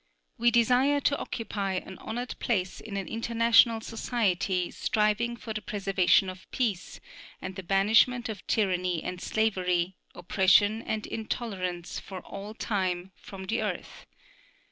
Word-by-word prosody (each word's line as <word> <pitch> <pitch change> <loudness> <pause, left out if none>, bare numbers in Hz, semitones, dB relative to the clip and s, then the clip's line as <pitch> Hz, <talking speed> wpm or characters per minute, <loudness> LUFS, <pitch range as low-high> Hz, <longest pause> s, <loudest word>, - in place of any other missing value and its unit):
We 240 +1 +5
desire 250 +4 +4
to 285 +1 +2
occupy 205 -4 -3
an 190 0 -5
honored 245 +3 -4
place 190 -7 -1
in 205 -3 -6
an 195 - -3
international 230 0 +4
society 195 -6 -1
striving 220 +2 0
for 225 -2 -6
the 215 - -4
preservation 195 -2 +2
of 185 0 -9
peace, 215 -8 -2 0.4
and 185 0 -6
the 190 - -5
banishment 215 +6 +3
of 215 -3 -7
tyranny 180 -5 +1
and 180 -1 -5
slavery, 185 -4 0 0.2
oppression 205 +4 +3
and 215 -2 -3
intolerance 190 -6 -4
for 190 -2 -8
all 200 +4 -8
time 185 -4 -2
from 190 -2 -10
the 225 +3 -1
earth. 205 -5 -5
205 Hz, 135 wpm, -28 LUFS, 185-230 Hz, 0.4 s, We